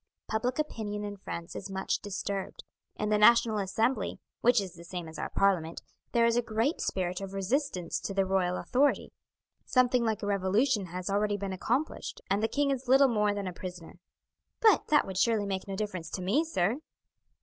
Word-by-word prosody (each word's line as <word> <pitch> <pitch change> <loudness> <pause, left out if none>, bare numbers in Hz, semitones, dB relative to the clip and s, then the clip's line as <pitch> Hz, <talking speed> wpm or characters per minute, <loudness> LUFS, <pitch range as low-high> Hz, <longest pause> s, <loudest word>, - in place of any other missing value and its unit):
Public 245 +3 -1
opinion 215 -9 -3
in 205 0 -5
France 170 -3 -7
is 195 - -6
much 190 0 -1
disturbed. 200 -1 -4 0.3
In 210 - -2
the 210 0 +3
National 225 0 +5
Assembly, 215 +4 0 0.2
which 245 0 +4
is 190 -3 -5
the 170 -1 -12
same 175 -1 -6
as 160 -1 -9
our - - -3
Parliament, 175 -5 +1 0.3
there 235 -1 +4
is 235 0 +3
a 240 - +3
great 230 +6 -1
spirit 180 0 -2
of 195 0 -6
resistance 195 - -1
to - - -5
the 195 0 +1
royal 185 -1 +1
authority, 275 +3 +1 0.5
something 250 -1 +3
like 220 -3 -1
a - - -1
revolution 205 +3 +1
has 180 +1 -6
already 205 +1 +1
been 195 -1 -4
accomplished, 250 - -2
and 200 +1 +2
the 225 - +2
king 285 +3 +1
is 265 -1 -3
little 270 +2 +6
more 210 -3 +1
than 200 -1 -3
a 185 - -4
prisoner." 175 -1 -9 0.6
"But 440 -4 +4
that 300 -1 +4
would 190 -1 -3
surely 220 0 +2
make 190 -1 -3
no 195 - -4
difference 190 -5 -4
to 185 - -3
me, 255 - +2
sir!" 230 - 0
205 Hz, 195 wpm, -29 LUFS, 190-235 Hz, 0.6 s, little